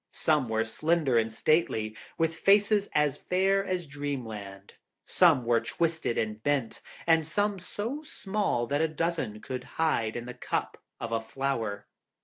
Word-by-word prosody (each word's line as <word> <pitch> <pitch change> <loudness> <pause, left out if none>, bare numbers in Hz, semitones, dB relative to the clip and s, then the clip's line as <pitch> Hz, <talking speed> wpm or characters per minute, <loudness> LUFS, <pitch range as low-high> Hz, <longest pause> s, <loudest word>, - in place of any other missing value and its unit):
Some 150 -6 +1
were 110 0 +1
slender 150 +1 +2
and 115 0 -1
stately, 110 -5 +1 0.2
with 165 0 +1
faces 200 +4 +3
as 150 -2 +2
fair 195 +2 +2
as 185 -3 -2
dreamland; 115 -9 -6 0.3
some 160 -9 +4
were 115 -1 +3
twisted 165 +1 -1
and 110 0 -2
bent, 140 -3 -1 0.2
and 160 -1 +4
some 205 +5 0
so 220 +10 -4
small 200 - -1
that 145 +4 0
a 160 - +3
dozen 155 -9 -2
could 125 -1 -5
hide 115 -9 +1
in 120 0 -4
the 125 - -6
cup 125 - -3 0.2
of 115 - -4
a 115 0 0
flower. 115 -3 -2
145 Hz, 150 wpm, -29 LUFS, 115-170 Hz, 0.3 s, some